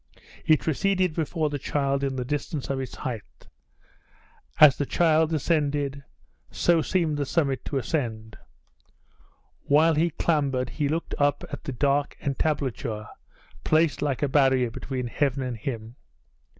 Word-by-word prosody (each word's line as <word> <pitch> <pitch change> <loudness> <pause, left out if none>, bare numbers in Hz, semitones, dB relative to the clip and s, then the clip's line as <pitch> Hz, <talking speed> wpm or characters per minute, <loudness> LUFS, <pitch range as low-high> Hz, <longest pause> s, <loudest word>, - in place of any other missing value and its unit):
It 155 -1 +4
receded 185 +2 +1
before 160 -1 -1
the 145 - -3
child 140 0 -1
in 135 -1 -1
the 125 -1 -3
distance 145 +1 -3
of 135 - -2
its 130 - -5
height. 105 - -7 1.1
As 145 -4 +9
the 145 - -2
child 160 -1 +3
ascended, 145 -3 0 0.5
so 170 -2 +2
seemed 160 -2 0
the 145 - -1
summit 140 -4 0
to 140 - -2
ascend. 110 -6 -3 1.3
While 155 +3 +5
he 160 +3 +2
clambered 140 -6 0
he 145 -2 -1
looked 165 +3 -2
up 145 0 +2
at - - -7
the - - -3
dark 140 +3 0
entablature 135 -6 -2 0.5
placed 155 -1 +2
like 145 -2 -1
a - - +3
barrier 130 -3 +3
between 130 +1 -4
heaven 135 +2 -1
and 125 -2 -3
him. 115 0 -6
140 Hz, 140 wpm, -26 LUFS, 130-155 Hz, 1.3 s, As